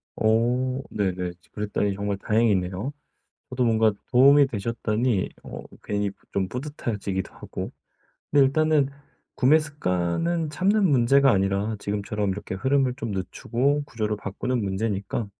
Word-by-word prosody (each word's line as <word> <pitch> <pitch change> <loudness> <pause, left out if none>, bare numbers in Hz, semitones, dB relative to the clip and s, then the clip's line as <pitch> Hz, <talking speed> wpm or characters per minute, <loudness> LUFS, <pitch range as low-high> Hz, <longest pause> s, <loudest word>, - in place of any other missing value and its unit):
오. 125 +4 +1
네네. 90 -3 -2
지 - - -28
그랬다니 105 -1 -1
정말 100 0 -2
다행이네요. 105 +2 0 0.6
저도 125 -1 0
뭔가 110 -1 +4 0.2
도움이 140 +3 +7
되셨다니 115 -1 -1
어 - - -8 0.2
괜히 105 0 -1 0.2
좀 95 -1 0
뿌듯해지기도 110 - -4
하고. - - -7 0.6
근데 145 -1 +5
일단은 150 0 +3 0.5
구매 145 +5 +5
습관은 150 - -1
참는 195 +6 +2
문제가 135 -1 +4
아니라 100 +2 0
지금처럼 105 0 -2
이렇게 95 0 -5
흐름을 130 +5 +1
좀 115 -3 -4
늦추고 130 +9 -1
구조를 110 -5 -2
바꾸는 120 +5 -2
문제니까 100 +2 -2
115 Hz, 310 characters per minute, -25 LUFS, 100-135 Hz, 0.6 s, 도움이